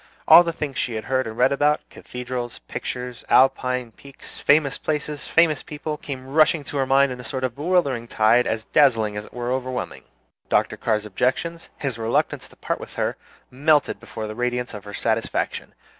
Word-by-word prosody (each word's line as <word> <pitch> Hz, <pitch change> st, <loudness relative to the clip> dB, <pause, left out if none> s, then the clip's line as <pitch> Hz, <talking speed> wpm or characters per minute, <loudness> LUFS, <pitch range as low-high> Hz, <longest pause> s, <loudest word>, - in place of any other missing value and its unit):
All 175 Hz, -, +10 dB
the 170 Hz, -, -1 dB
things 150 Hz, -4 st, -4 dB
she 120 Hz, -, -2 dB
had 110 Hz, -, -3 dB
heard 130 Hz, -2 st, 0 dB
about -, -, -3 dB
and -, -, -15 dB
read 125 Hz, -, +4 dB
about 145 Hz, +2 st, +1 dB
cathedrals, 125 Hz, -1 st, -6 dB
pictures, 125 Hz, -1 st, -5 dB
Alpine 125 Hz, -2 st, +3 dB
peaks, 140 Hz, +4 st, -12 dB
famous 145 Hz, -1 st, +3 dB
places, 150 Hz, -1 st, -3 dB
famous 165 Hz, -3 st, +3 dB
people 150 Hz, 0 st, -5 dB
came 130 Hz, -3 st, -7 dB
rushing 155 Hz, +3 st, +3 dB
into 145 Hz, 0 st, -6 dB
her 135 Hz, -1 st, +1 dB
mind 135 Hz, 0 st, +4 dB
in 125 Hz, -, -6 dB
a -, -, -8 dB
sort 130 Hz, +1 st, -4 dB
of 130 Hz, -2 st, -1 dB
bewildering 145 Hz, -7 st, 0 dB
tide 115 Hz, +3 st, +3 dB
as 110 Hz, 0 st, -2 dB
dazzling 115 Hz, -8 st, +3 dB
as 105 Hz, 0 st, -5 dB
it -, -, -17 dB
was 120 Hz, 0 st, -3 dB
overwhelming. 130 Hz, -1 st, -4 dB, 0.4 s
Dr. -, -, +2 dB
Carr's 110 Hz, -2 st, -1 dB
objections, 130 Hz, -, -2 dB
his 130 Hz, -5 st, -3 dB
reluctance 115 Hz, +1 st, 0 dB
to -, -, -19 dB
part -, -, -3 dB
with -, -, -10 dB
her, -, -, -1 dB, 0.4 s
melted 145 Hz, -3 st, +2 dB
before 110 Hz, -1 st, -7 dB
the 110 Hz, -, -5 dB
radiance 125 Hz, +1 st, -2 dB
of 105 Hz, -1 st, -8 dB
her 105 Hz, -, -9 dB
satisfaction. 115 Hz, 0 st, -2 dB
130 Hz, 190 wpm, -23 LUFS, 115-145 Hz, 0.4 s, All